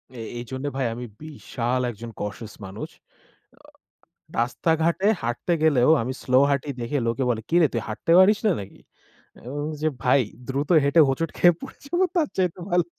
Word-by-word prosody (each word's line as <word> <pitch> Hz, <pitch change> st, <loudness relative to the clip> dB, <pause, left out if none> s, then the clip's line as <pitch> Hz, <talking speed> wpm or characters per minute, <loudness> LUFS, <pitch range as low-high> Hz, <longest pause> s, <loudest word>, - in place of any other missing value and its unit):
এ -, -, -9 dB, 0.2 s
এইজন্য 130 Hz, +3 st, -6 dB
ভাই 130 Hz, -, 0 dB
আমি 120 Hz, +1 st, -6 dB, 0.2 s
বিশাল 130 Hz, -5 st, -3 dB
একজন 115 Hz, +2 st, -9 dB
কসেস 105 Hz, +1 st, -6 dB
মানুষ। 95 Hz, +3 st, -7 dB
আ -, -, -62 dB, 1.4 s
রাস্তাঘাটে 165 Hz, +9 st, +1 dB, 0.2 s
হাঁটতে 120 Hz, +9 st, -2 dB
গেলেও 145 Hz, -3 st, +4 dB
আমি 130 Hz, +3 st, -3 dB
স্লো 130 Hz, 0 st, +3 dB
হাটি 140 Hz, +1 st, -1 dB
দেখে 120 Hz, +5 st, -1 dB
লোকে 115 Hz, +3 st, -1 dB
বলে 110 Hz, -2 st, 0 dB
কিরে 170 Hz, -2 st, +5 dB
তুই 115 Hz, -2 st, -1 dB
হাঁটতে 110 Hz, +9 st, -1 dB
পারিস 205 Hz, +3 st, +6 dB
না -, -, +5 dB
নাকি? 95 Hz, -, -11 dB, 0.6 s
আমি -, -, -16 dB
বল্লাম 150 Hz, +1 st, -3 dB
যে 155 Hz, -, +3 dB
ভাই 130 Hz, +2 st, +4 dB, 0.3 s
দ্রুত 140 Hz, +2 st, -2 dB, 0.2 s
হেঁটে 150 Hz, +4 st, +4 dB
হোঁচট 155 Hz, +5 st, 0 dB
খেয়ে 175 Hz, -1 st, +5 dB
পড়ে -, -, -9 dB
যাবো 350 Hz, +5 st, +1 dB
তার 325 Hz, -5 st, +2 dB
চেয়ে 180 Hz, -2 st, +2 dB, 0.2 s
ভালো। 175 Hz, -1 st, +3 dB
140 Hz, 170 wpm, -24 LUFS, 120-165 Hz, 1.4 s, পারিস